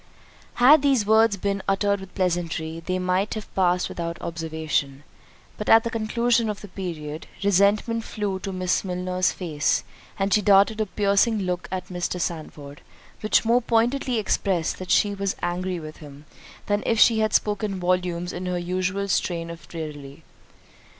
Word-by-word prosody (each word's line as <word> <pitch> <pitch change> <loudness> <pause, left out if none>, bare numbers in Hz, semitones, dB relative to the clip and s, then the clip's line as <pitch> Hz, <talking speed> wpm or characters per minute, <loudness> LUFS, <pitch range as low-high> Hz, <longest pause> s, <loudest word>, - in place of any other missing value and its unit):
Had 275 +5 +7
these 270 -7 +2
words 220 -1 +4
been 200 +1 -2
uttered 200 +1 +1
with 190 -1 -12
pleasantry, 165 -3 -2
they 185 +2 -1
might 185 +3 0
have 215 - -8
passed 180 -1 +2
without 170 -1 -5
observation; 160 -4 -3 0.6
but 210 - -3
at 225 0 +7
the 230 - -3
conclusion 230 +1 +1
of 210 - -4
the 205 - -10
period, 160 -5 -6 0.2
resentment 200 +4 +2
flew 205 -4 -3
to 195 - -5
Miss 185 -1 0
Milner's 180 0 -1
face, 155 -6 -1 0.3
and 195 0 0
she 210 - +4
darted 205 +2 +4
a 215 - -1
piercing 205 +2 +2
look 180 -1 -3
at 185 -1 -4
Mr. 180 0 -3
Sandford, 150 -4 -5 0.4
which 215 +1 +2
more 235 +2 +3
pointedly 240 +2 +1
expressed 190 -5 0
that 185 -1 -7
she 205 +3 +3
was 200 -1 -2
angry 180 +1 -2
with 155 -1 -9
him, 145 -1 -13 0.4
than 205 0 0
if 225 -1 +2
she 225 -1 +6
had 215 0 +1
spoken 205 -2 0
volumes 180 -1 -1
in 180 +1 -5
her 180 0 -1
usual 185 +3 -2
strain 170 -3 -1
of 170 - -11
raillery. 150 -2 -8
185 Hz, 165 wpm, -24 LUFS, 175-210 Hz, 0.6 s, Had